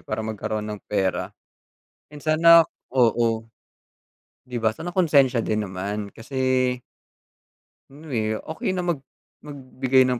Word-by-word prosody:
para 110 +1 -3
magkaroon 110 0 -3
ng 105 -1 -6
pera. 95 -3 -1 0.8
And 145 - -10
sana 165 +2 +6 0.3
oo. 115 -2 +2 1.0
Di 125 -1 -5
ba? 110 -2 +1
Sana 175 - -6
konsensiya 140 -9 +4
din 110 0 0
naman 100 +2 -4
kasi 130 +1 0 1.1
Ano 150 +1 -12
eh, 110 -2 0 0.2
okey 175 +4 -2
na 180 - -1
mag 170 -5 -1 0.4
magbigay 130 -2 +1
ng 125 -1 0
125 Hz, 125 wpm, -24 LUFS, 110-145 Hz, 1.1 s, sana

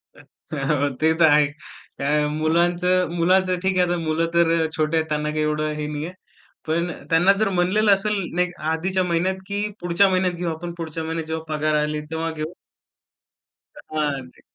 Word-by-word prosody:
हो, - - -16 0.6
हो, 145 +1 +1
ते 160 +1 +4
तर 170 - +7
आहे. 150 0 +5 0.5
काय 150 +2 +1
मुलांचं 175 +4 +1
मुलाचं 185 +1 +3
ठीक 190 0 +1
आहे. 180 - +4
आता 175 - 0
मुलं 165 0 0
तर 165 -1 +3
छोटे 155 +1 +1
आहेत, 160 - +1
त्यांना 150 0 -1
काही 155 0 -1
एवढं 150 0 0
हे 150 - -2
नाहीये, 150 +3 -4 0.6
पण 170 +2 0 0.2
त्यांना 175 +4 +5
जर 215 - +3
म्हणलेलं 195 +3 +3
असेल 205 +2 +1 0.2
नाही 180 0 +2 0.2
आधीच्या 185 +4 0
महिन्यात 180 +2 0
की 205 +1 -2 0.2
पुढच्या 175 +3 +3
महिन्यात 185 -1 +1
घेऊ 175 0 -2
आपण, 170 +2 -6
पुढच्या 160 -1 -4
महिन्यात 160 0 -3
जेव्हा 160 0 -4
पगार 155 0 0
आली 150 0 -2
तेव्हा 160 0 -2
घेऊ 155 +1 -5 1.4
हां, 145 -4 -2
ते. - - -22
165 Hz, 175 wpm, -23 LUFS, 155-180 Hz, 1.4 s, तर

